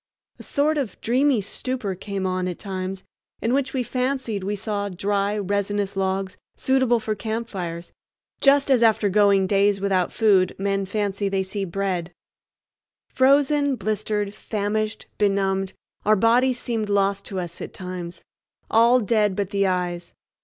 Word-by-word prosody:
A - - -9
sort 300 +1 +1
of 260 -7 -4
dreamy 255 0 +2
stupor 220 +1 -4
came 195 +1 -4
on 185 0 -1
at 180 - -4
times 190 -1 -5 0.4
in 230 - 0
which 275 0 +1
we 260 -2 -1
fancied 250 -4 -2
we 205 +2 -1
saw 205 -1 -3
dry, 200 +2 -1
resinous 200 0 -1
logs 190 0 -1 0.2
suitable 260 -3 +2
for 220 0 -2
campfires, 200 -6 -5 0.5
just 280 0 +4
as 250 -3 +4
after 220 -3 +4
going 200 -1 +4
days 200 +1 +2
without 190 -2 +1
food 195 -5 +3
men 195 0 -1
fancy 200 0 -1
they 195 -1 0
see 195 +1 -3
bread. 180 -2 -2 1.0
Frozen, 285 +1 +3
blistered, 210 -1 -2
famished, 215 +1 -2
benumbed, 195 -2 +1 0.3
our 215 - +4
bodies 240 +4 +3
seemed 225 -3 -2
lost 200 0 +1
to 195 -3 -4
us 175 -2 -6
at - - -6
times—all 185 +6 -1
dead 210 -2 +2
but 200 -1 -2
the 200 -1 +2
eyes. 175 -2 -2
205 Hz, 145 wpm, -23 LUFS, 190-230 Hz, 1.0 s, just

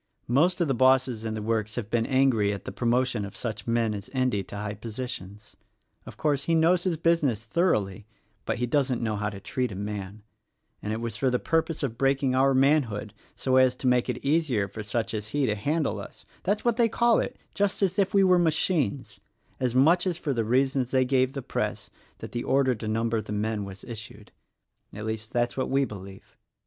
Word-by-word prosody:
Most 165 +10 +3
of 170 - +2
the 135 - +1
bosses 130 -2 +3
in 110 -1 -2
the 105 - -4
works 110 -1 -1
have 110 -3 -4
been 115 -1 +1
angry 130 -6 +3
at 100 - -6
the - - -4
promotion 120 -2 0
of 100 - -8
such 110 -3 -5
men 115 -2 +1
as 100 -1 -7
Endy 130 -6 +1
to - - -9
high 105 +1 -3
positions. 105 -2 -7 0.5
Of - - -10
course, 145 -2 0
he 165 - +2
knows 170 +3 +3
his 175 -3 0
business 150 -9 +1
thoroughly, 105 - 0 0.4
but - - -1
he 125 - 0
doesn't 130 -1 +1
know 110 -2 0
how 105 0 -1
to 100 -2 -8
treat 125 +4 -2
a - - -6
man; 100 0 -5 0.6
and 105 - -3
it 110 +1 -3
was 115 -2 -4
for 130 - +2
the 125 - +1
purpose 160 +2 -1
of 115 -4 -3
breaking 135 -1 +2
our 135 +1 +3
manhood 130 -7 +2 0.2
so 130 -1 +1
as 130 -1 +5
to 130 - -8
make 125 0 +3
it 125 - -1
easier 140 -9 +1
for 105 +3 -7
such 110 +2 -2
as 105 -1 -3
he 145 +4 0
to 105 - +1
handle 145 +9 -1
us - - -11
— - - -30
that's 205 +4 0
what 235 -2 +2
they 235 -2 +4
call 235 +1 +3
it, - - -3 0.2
just 200 0 0
as 190 +1 +1
if 195 -1 +2
we 200 -1 +4
were 185 -1 +5
machines, 145 - 0 0.2
— - - -38
as 125 -2 -1
much 165 +8 +4
as 175 -3 -1
for 150 -5 -2
the 115 -2 0
reasons 130 +2 +1
they 130 -1 +2
gave 130 0 +2
the 135 -2 -5
Press - - -3 0.3
that - - -8
the 120 - -3
order 135 -1 +2
to 110 -1 -6
number 115 +1 0
the 105 - -9
men 105 0 -1
was 95 0 -10
issued; 110 -3 -9 0.3
— - - -45
at 105 +1 -6
least 110 0 -4
that's 120 0 0
what 130 - -2
we 135 +1 +2
believe. 100 -3 -11
125 Hz, 225 wpm, -27 LUFS, 110-140 Hz, 0.6 s, as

